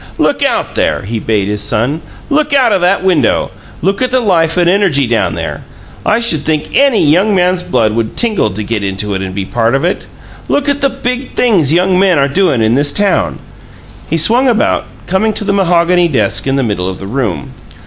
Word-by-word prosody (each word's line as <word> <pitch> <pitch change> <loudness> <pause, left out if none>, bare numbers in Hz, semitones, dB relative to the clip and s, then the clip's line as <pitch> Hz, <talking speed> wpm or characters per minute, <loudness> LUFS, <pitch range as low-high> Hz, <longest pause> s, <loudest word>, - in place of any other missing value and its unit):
"Look - - 0
out - - 0
there!" - - -1
he 110 +3 -4
bade 105 -3 -1
his 105 0 -2
son. 125 +10 -1 0.3
"Look 295 0 +1
out 250 -5 +3
o' 195 - +2
that 180 +1 +1
window! 185 -4 +1 0.3
Look 195 +5 0
at 255 - +1
the 255 +1 +1
life 170 -7 +1
and 175 -1 +3
energy 175 -7 +2
down 115 -1 0
there! - - -5 0.4
I 220 - +2
should 230 -10 +1
think 155 +1 -3
ANY 275 - +3
young 185 +8 +3
man's 180 0 +1
blood 115 -10 0
would 115 0 -3
tingle 215 - +1
to 105 +2 -5
get 105 -1 -3
into 100 +1 -2
it 95 - -3
and 95 -1 -5
be 100 -1 -3
part 115 +4 0
of 135 - -1
it. 180 - -2 0.4
Look 285 0 0
at 285 0 0
the 275 - +2
big 250 0 -4
things 190 - +2
young 180 +2 +2
men 190 -4 +3
are 140 0 +2
doin' 140 -6 +1
in 110 +1 +2
this 145 +2 +2
town!" 205 -2 0 0.7
He 165 - 0
swung 235 - +3
about, 235 -3 +1 0.2
coming 205 +4 0
to 210 - -4
the 200 -1 0
mahogany 175 -2 +2
desk 120 -6 -1
in 135 - +1
the 135 - 0
middle 100 -5 -2
of 95 - -6
the 95 - -9
room. 100 - -3
170 Hz, 215 wpm, -13 LUFS, -, 0.7 s, out